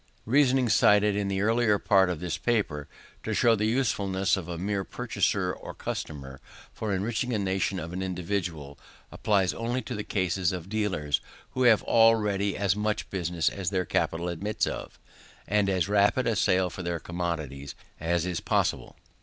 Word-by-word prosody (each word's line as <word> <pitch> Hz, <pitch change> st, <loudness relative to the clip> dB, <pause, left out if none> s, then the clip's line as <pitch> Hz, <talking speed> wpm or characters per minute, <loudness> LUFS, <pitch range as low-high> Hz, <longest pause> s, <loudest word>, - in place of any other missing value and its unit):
The 110 Hz, -, -8 dB
reasoning 135 Hz, -2 st, +4 dB
cited 105 Hz, -1 st, +4 dB
in 100 Hz, -1 st, -1 dB
the 95 Hz, 0 st, -1 dB
earlier 115 Hz, -1 st, +3 dB
part 95 Hz, -2 st, +3 dB
of 90 Hz, -3 st, -3 dB
this 90 Hz, -1 st, -3 dB
paper, 100 Hz, -12 st, -1 dB, 0.3 s
to -, -, -3 dB
show 115 Hz, -, +4 dB
the 105 Hz, 0 st, 0 dB
uselessness 100 Hz, -6 st, +1 dB
of 95 Hz, -3 st, -6 dB
a 85 Hz, -1 st, -5 dB
mere 100 Hz, +2 st, -1 dB
purchaser 100 Hz, -5 st, -1 dB
or -, -, -9 dB
customer, 70 Hz, -3 st, -6 dB, 0.3 s
for 110 Hz, -2 st, -3 dB
enriching 110 Hz, +5 st, -1 dB
a -, -, +1 dB
nation 95 Hz, -1 st, -1 dB
or -, -, -5 dB
an 95 Hz, -, -3 dB
individual, 90 Hz, -6 st, -3 dB, 0.3 s
applies 95 Hz, -6 st, +1 dB
only 120 Hz, +5 st, -2 dB
to 115 Hz, -, -5 dB
the 105 Hz, -2 st, -4 dB
case 95 Hz, -3 st, -1 dB
of 90 Hz, 0 st, -6 dB
dealers 95 Hz, -9 st, -1 dB, 0.3 s
who 130 Hz, 0 st, 0 dB
have 110 Hz, -3 st, +5 dB
already 105 Hz, -3 st, +3 dB
as 100 Hz, -2 st, +1 dB
much 105 Hz, 0 st, -2 dB
business 85 Hz, -3 st, -1 dB
as 95 Hz, -3 st, 0 dB
their 95 Hz, -2 st, -1 dB
capital 85 Hz, +1 st, -1 dB
admits 100 Hz, +5 st, -1 dB
of, -, -, -6 dB, 0.5 s
and 105 Hz, 0 st, +2 dB
as 95 Hz, -2 st, +1 dB
rapid 105 Hz, +5 st, +3 dB
a 115 Hz, -2 st, +1 dB
sale 95 Hz, -2 st, +2 dB
for 95 Hz, -, -7 dB
their 85 Hz, -1 st, -2 dB
commodities 80 Hz, -6 st, -4 dB, 0.2 s
as 85 Hz, +1 st, 0 dB
is 90 Hz, -2 st, -2 dB
possible. -, -, -1 dB
95 Hz, 175 wpm, -27 LUFS, 85-105 Hz, 0.5 s, have